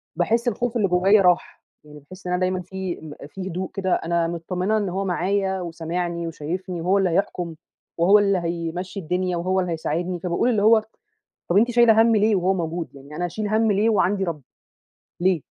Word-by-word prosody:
باحس 225 +8 +1
الخوف 240 +1 -1
اللي 210 -3 +2
جوايا 190 +3 +4
راح، 180 -2 +1 0.2
يعني 150 0 -13
باحس 185 +6 -12
إن 180 - -1
أنا 180 - +1
دايمًا 185 0 0
فيه 185 0 -5
م 155 -2 -9
فيه 190 +4 -7
هدوء 185 +1 -4
كده 190 -2 0
أنا 170 0 0
متطّمنة 180 +5 -1
إن 205 -3 -1
هو 190 +2 -2
معايا 190 +1 0
وسامعني 170 0 -3
وشايفني 170 +3 -5
وهو 185 +4 +2
اللي 195 -2 +2
هيحكم 175 -2 -1 0.4
وهو 190 +5 +6
اللي 200 -1 +2
هيمشّي 170 +2 -4
الدنيا 180 +1 -1
وهو 185 +2 0
اللي 180 -2 -1
هيساعدني، 170 +2 -2
فباقول 180 +7 0
اللي 215 -4 +1
هو: 220 +1 +6 0.7
"طَب 175 - +3
أنتِ 235 +4 +4
شايلة 235 -2 +5
هَم 230 0 +4
ليه 215 0 +3
وهو 185 0 +2
موجود؟ 170 -2 -3
يعني 140 +2 -12
أنا 175 +3 -2
أشيل 210 +5 -3
هَم 220 +1 +2
ليه 205 +3 +2
وعندي 200 -2 +2
رب؟ 165 -5 -3 0.8
ليه؟" 180 -2 +2
185 Hz, 195 wpm, -23 LUFS, 170-200 Hz, 0.8 s, وهو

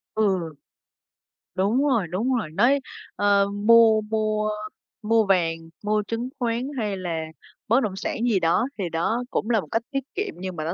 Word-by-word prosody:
Ừ. 190 -7 +1 1.0
Đúng 205 +8 +2
rồi, 230 -10 +1
đúng 215 +10 -1
rồi, 220 -10 -2
nói, 250 - +3 0.4
ờ, 200 -1 +3
mua 220 +1 +5
mua 215 0 -1 0.5
mua 225 0 +3
vàng, 175 -4 +2 0.3
mua 210 0 +1
chứng 230 +2 -3
khoán 240 +1 -1
hay 210 -4 -2
là 170 -3 -3 0.4
bất 235 +4 +4
động 200 -3 -2
sản 195 - -3
gì 205 -5 +3
đó 175 +8 +2
thì 185 -4 -2
đó 195 +9 -1
cũng 220 - -1
là 225 -3 +3
một - - -11
cách 225 - +1
tiết 275 -2 -1
kiệm 410 +1 -3
nhưng 185 -1 -5
mà 155 - -4
nó 165 - -2
215 Hz, 180 wpm, -24 LUFS, 185-230 Hz, 1.0 s, mua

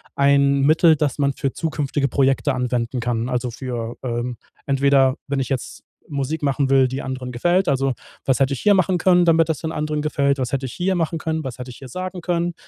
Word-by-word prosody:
ein 140 0 +3
Mittel, 160 +3 +5
das 150 -2 -1
man 140 -1 +2
für 135 +1 -2
zukünftige 145 -3 -1
Projekte 135 +1 +1
anwenden 125 -1 -1
kann. 120 0 -1
Also 125 -1 -2
für, 120 -2 -5
ähm, 120 -1 -3 0.3
entweder, 135 -1 +3
wenn 140 -1 -1
ich 130 - -3
jetzt 130 -3 -4 0.3
Musik 145 +2 -3
machen 140 -1 +1
will, 135 -1 +5
die 130 +2 -4
anderen 130 -1 -5
gefällt, 175 +10 +1
also: 135 -1 +1 0.3
„Was 135 - +2
hätte 135 0 +2
ich 135 - -5
hier 205 - +5
machen 185 -1 +2
können, 180 0 +4
damit 165 -1 +4
das 160 - -1
den 160 0 -4
anderen 150 0 -2
gefällt? 140 -2 +1
Was 130 0 -3
hätte 135 -1 -1
ich - - -8
hier 185 +1 0
machen 165 -1 -1
können? 160 0 -2
Was 130 -2 -6
hätte 125 0 -7
ich - - -12
hier 135 - -10
sagen 185 +4 -5
können? 175 0 -1
140 Hz, 220 wpm, -21 LUFS, 130-160 Hz, 0.3 s, Mittel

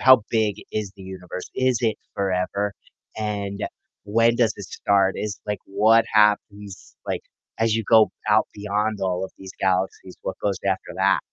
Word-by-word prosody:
how 130 -3 +7
big 110 -3 +1 0.2
is 105 -3 -2
the 95 - -11
universe? 90 -1 -8
Is 130 -2 +2
it 110 -2 +2 0.2
forever? 100 +1 -1 0.4
And 100 -2 -3 0.4
when 115 +3 +3
does 115 -3 +3
it 100 - -7
start? 100 -1 +2
Is, 105 -1 -4
like, 105 0 -2
what 110 +3 +4
happens, 105 -2 +1
like, - - -2 0.4
as 115 -1 +2
you 115 - 0
go 110 -1 +6 0.2
out 110 +1 +4
beyond 105 +1 -1
all 95 0 0
of - - -9
these 95 -1 -9
galaxies, 95 0 -1
what 95 - -4
goes 100 - +1
after 95 -1 -1
that? - - +3
105 Hz, 165 wpm, -23 LUFS, 95-110 Hz, 0.4 s, how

